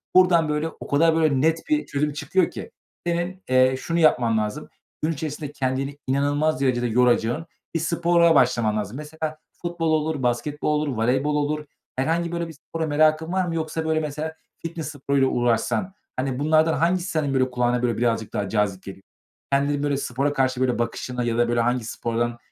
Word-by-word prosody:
buradan, 175 Hz, -4 st, +5 dB
böyle, 150 Hz, +2 st, 0 dB
o -, -, -11 dB
kadar 160 Hz, +3 st, +3 dB
böyle 155 Hz, -5 st, +2 dB
net 160 Hz, +2 st, +3 dB
bir 305 Hz, 0 st, +2 dB
çözüm 145 Hz, +1 st, -1 dB
çıkıyor 180 Hz, +4 st, +1 dB
ki. -, -, -8 dB, 0.4 s
Senin, 175 Hz, +2 st, -2 dB
eee, 130 Hz, 0 st, +4 dB
şunu 170 Hz, +3 st, -1 dB
yapman 120 Hz, -8 st, +4 dB
lazım. 105 Hz, -1 st, -3 dB, 0.3 s
Gün 155 Hz, +2 st, +1 dB
içerisinde 150 Hz, -1 st, -5 dB
kendini 135 Hz, 0 st, -2 dB
inanılmaz 145 Hz, +2 st, +1 dB
derecede 120 Hz, -2 st, +1 dB
yoracağın 120 Hz, +4 st, +2 dB, 0.3 s
bir -, -, +2 dB
spora 170 Hz, 0 st, +3 dB
başlaman 120 Hz, -5 st, +3 dB
lazım. 105 Hz, +3 st, -4 dB
Mesela 155 Hz, +1 st, -5 dB
futbol 170 Hz, -1 st, -3 dB
olur, 155 Hz, -2 st, 0 dB
basketbol 150 Hz, +5 st, 0 dB
olur, 150 Hz, -, -2 dB
voleybol 130 Hz, +6 st, +1 dB
olur 150 Hz, +1 st, -1 dB, 0.3 s
herhangi 165 Hz, +6 st, 0 dB
böyle 170 Hz, 0 st, -2 dB
bir 165 Hz, -, -9 dB
spora 160 Hz, +2 st, -5 dB
merakın 155 Hz, +2 st, +2 dB
var 190 Hz, -1 st, +1 dB
mı 165 Hz, -, -2 dB
yoksa, 160 Hz, 0 st, -2 dB
böyle, 160 Hz, 0 st, +1 dB
mesela 155 Hz, +1 st, -4 dB, 0.3 s
fitness 165 Hz, -3 st, -4 dB
sporuyla 140 Hz, -1 st, +1 dB
uğraşsan, 120 Hz, -, 0 dB, 0.2 s
hani, 130 Hz, 0 st, -2 dB
bunlardan 155 Hz, +2 st, +3 dB
hangisi 175 Hz, +3 st, +1 dB
senin, 150 Hz, -5 st, 0 dB
böyle, 130 Hz, -1 st, +2 dB
kulağına, 125 Hz, 0 st, +1 dB
böyle, 120 Hz, -3 st, 0 dB
birazcık 115 Hz, -2 st, 0 dB
daha 100 Hz, -2 st, -2 dB
cazip 105 Hz, -3 st, 0 dB
geliyor? 95 Hz, 0 st, -10 dB, 0.5 s
Kendinin, 140 Hz, +1 st, +1 dB
böyle, 145 Hz, -1 st, +1 dB
spora 140 Hz, +2 st, -1 dB
karşı, 130 Hz, -2 st, 0 dB
böyle, 125 Hz, -2 st, +1 dB
bakışına 125 Hz, +1 st, -2 dB
ya 115 Hz, -1 st, -1 dB
da, 120 Hz, -, +3 dB
böyle, 120 Hz, -, +1 dB
hangi 120 Hz, +1 st, +1 dB
spordan 120 Hz, +1 st, -2 dB
145 Hz, 180 wpm, -24 LUFS, 125-160 Hz, 0.5 s, buradan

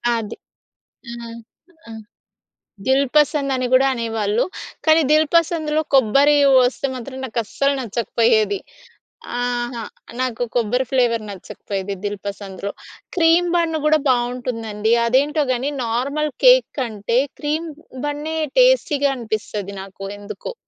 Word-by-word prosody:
అది 225 Hz, -3 st, -4 dB, 0.7 s
హ్మ్. 235 Hz, -1 st, -8 dB, 0.5 s
ఆ! -, -, -8 dB, 1.0 s
దిల్‌పసంద్ 280 Hz, +2 st, +2 dB
అని 255 Hz, -1 st, -1 dB
కూడా 265 Hz, +1 st, +5 dB
అనేవాళ్ళు. 225 Hz, -2 st, -1 dB, 0.4 s
కానీ, 315 Hz, 0 st, +5 dB
దిల్‌పసంద్‌లో 315 Hz, 0 st, +2 dB
కొబ్బరి 275 Hz, +4 st, +5 dB, 0.3 s
వస్తే 255 Hz, +2 st, 0 dB
మాత్రం 260 Hz, +2 st, -7 dB
నాకస్సలు 245 Hz, +4 st, -1 dB
నచ్చకపోయేది. 225 Hz, -2 st, +1 dB, 0.8 s
ఆహా! 240 Hz, -1 st, -2 dB, 0.4 s
నాకు 245 Hz, -2 st, -1 dB
కొబ్బరి 245 Hz, +2 st, +1 dB
ఫ్లేవర్ 240 Hz, -4 st, +2 dB
నచ్చకపోయేది 195 Hz, 0 st, -6 dB
దిల్‌పసంద్‌లో. 200 Hz, -1 st, -5 dB, 0.5 s
క్రీమ్ 340 Hz, +1 st, +4 dB
బన్ 335 Hz, -2 st, +1 dB
కూడా 310 Hz, 0 st, +4 dB
బాగుంటుందండి, 240 Hz, -3 st, -1 dB
అదేంటో 285 Hz, +6 st, +2 dB
గాని 255 Hz, +3 st, -1 dB
నార్మల్ 280 Hz, +6 st, -1 dB
కేక్ -, -, +7 dB
కంటే 230 Hz, -2 st, -1 dB, 0.2 s
క్రీమ్ 310 Hz, +2 st, -2 dB, 0.4 s
బన్నే 295 Hz, +2 st, -3 dB, 0.2 s
టేస్టీగా 310 Hz, -, +4 dB
అనిపిస్తుంది 210 Hz, -3 st, -4 dB
నాకు 195 Hz, 0 st, -11 dB, 0.2 s
ఎందుకో. 205 Hz, -, -7 dB
250 Hz, 100 wpm, -20 LUFS, 225-295 Hz, 1.0 s, కేక్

